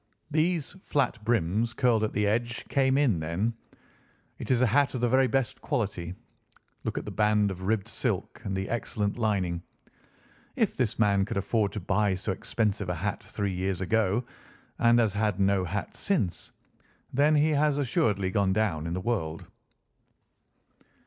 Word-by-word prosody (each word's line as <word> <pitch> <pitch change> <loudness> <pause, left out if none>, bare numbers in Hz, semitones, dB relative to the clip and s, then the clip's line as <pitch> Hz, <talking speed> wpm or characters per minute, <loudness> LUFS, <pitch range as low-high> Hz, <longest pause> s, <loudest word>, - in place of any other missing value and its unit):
These 160 0 +1
flat 125 - 0
brims 110 +1 +1
curled 120 -3 +2
at 110 - 0
the 105 - +1
edge 120 +3 -1
came 135 -1 +3
in 125 - +3
then. 85 +9 -1 0.9
It - - -6
is 125 -2 +3
a - - +6
hat 140 +4 +2
of 125 - -2
the 120 - +3
very 130 +2 +4
best 130 +1 -1
quality. 100 - -2 0.7
Look - - -3
at - - -3
the - - -5
band 105 -1 +2
of 95 -1 -7
ribbed 100 +1 0
silk - - -3
and 95 -1 -2
the 95 +1 -2
excellent 105 -2 -2
lining. 95 -6 0 0.9
If - - +1
this 120 -4 0
man 100 -3 +3
could 100 - -3
afford 100 +1 +1
to 105 - -3
buy 100 +1 +1
so 95 +2 -3
expensive 105 0 -1
a 90 - -1
hat 100 +5 -3
three 100 -2 -3
years 95 0 -1
ago, 110 +3 +1 0.5
and 120 0 +5
has 110 -4 +3
had 105 -2 0
no 100 -1 +3
hat 100 +4 -4
since, 155 - -1 0.6
then 145 +4 +4
he 150 +1 +4
has 150 -1 +2
assuredly 115 - +1
gone 95 -1 +2
down 95 -7 0
in 85 - -2
the - - -2
world." 85 -8 -2
105 Hz, 170 wpm, -28 LUFS, 95-120 Hz, 0.9 s, a